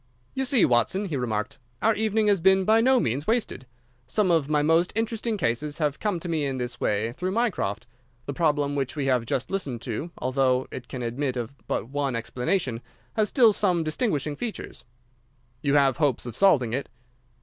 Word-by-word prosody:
"You 265 - -1
see, 255 -5 +5
Watson," 125 - +2
he 170 -6 -3
remarked, 125 +1 -3 0.2
"our 225 - +3
evening 220 0 +1
has 200 -4 +3
been 190 +1 +4
by 220 +2 +5
no 260 +2 +4
means 135 - -1
wasted. 220 - -1 0.4
Some 185 +8 +1
of 160 -4 +2
my 150 -1 +2
most 165 +3 +3
interesting 225 0 -1
cases 145 - -1
have 150 -3 -1
come 205 -5 -1
to 175 - -5
me 160 -3 -1
in 135 -2 -2
this 125 -1 -4
way 105 +3 0
through 180 +9 -3
Mycroft. 210 - -1 0.4
The 140 - -4
problem 145 -2 +1
which 135 -1 -2
we 145 -2 -2
have 125 -4 +1
just 130 - -2
listened 140 -12 -3
to, 130 +7 -4
although 130 0 +1
it 125 - -7
can 125 -2 -6
admit 125 +2 -2
of 120 +2 -4
but 110 - -2
one 140 -2 -1
explanation, 125 - -2 0.3
has 215 -2 +1
still 235 -5 +5
some 180 -5 +1
distinguishing 155 - -1
features." 225 +6 -6 0.8
"You 140 0 +1
have 135 -3 +4
hopes 140 -6 +1
of 120 - -6
solving 140 - +3
it?" 135 +3 -3
145 Hz, 190 wpm, -25 LUFS, 125-195 Hz, 0.8 s, see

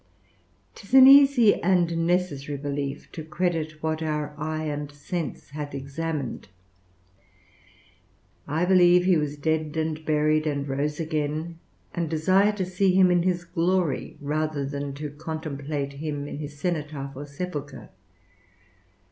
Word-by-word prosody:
'Tis 215 +5 -4
an 265 -1 +10
easy 275 -5 +7
and 170 -2 +2
necessary 150 -6 -1
belief, 140 0 -4
to 160 - -7
credit 160 -2 -2
what 160 0 -1
our 150 -1 -2
eye 155 +1 -3
and 145 -1 -4
sense 145 0 -5
hath 145 -1 -6
examined: 140 0 -4 2.0
I 160 +4 0
believe 180 -1 +5
he 185 -1 +4
was 150 -1 -2
dead 155 +1 -1
and 155 0 -2
buried, 155 0 +2
and 140 -1 -2
rose 145 +3 -2
again; 155 +1 -3 0.3
and 170 -2 -2
desire 185 +6 +3
to 195 -3 -2
see 185 +1 +1
him 185 -1 +6
in 175 -1 +3
his 175 -1 0
glory, 175 -2 -1
rather 150 0 -2
than 140 0 -4
to 150 0 -5
contemplate 145 -2 -4
him 145 0 -4
in 145 - -6
his 145 -1 -7
cenotaph 150 -4 -3
or 145 +2 -7
sepulchre. 145 -6 -6
155 Hz, 135 wpm, -25 LUFS, 145-175 Hz, 2.0 s, an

